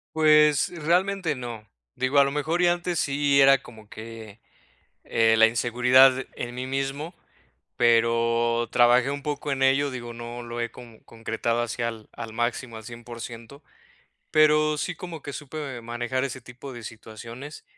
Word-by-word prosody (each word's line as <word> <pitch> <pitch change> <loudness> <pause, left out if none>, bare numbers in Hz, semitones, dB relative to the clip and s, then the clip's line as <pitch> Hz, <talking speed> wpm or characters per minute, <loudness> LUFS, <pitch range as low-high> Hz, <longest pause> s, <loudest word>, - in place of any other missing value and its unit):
Pues, 150 -2 +5
realmente 175 +1 0
no, 120 -5 -8 0.3
digo, 130 +2 +2
a 140 - +6
lo 140 - -1
mejor 155 +5 -1
y 175 - +5
antes 175 0 0
sí 140 0 +2
era 135 0 +7
como 110 -3 -14
que, 110 -1 -10 0.7
eh, 115 -1 +3
la 110 - +7
inseguridad 125 +3 +4
en 120 0 -6
mí 125 - -4
mismo, 135 +5 -3 0.6
pero, 115 0 +2
trabajé 120 +1 +4
un 140 0 -4
poco 145 0 -3
en 135 -1 0
ello, 135 +2 +3
digo, 120 -2 -7
no 120 +1 -7
lo 120 0 -5
he 120 - -2
como 115 -1 -14
concretado 115 +1 -2
así 120 0 -5
al 115 -2 -4
al 115 -2 -8
máximo, 120 0 -2
al 110 - -10
100% 120 +3 -10 0.7
pero 155 0 +4
sí, 180 - -3
como 170 -2 -8
que 140 - -7
supe 140 -4 -6
manejar 120 +3 -3
ese 130 -1 -5
tipo 125 +2 -10
de 120 - -9
situaciones, 115 +6 -10
125 Hz, 160 wpm, -25 LUFS, 115-145 Hz, 0.7 s, era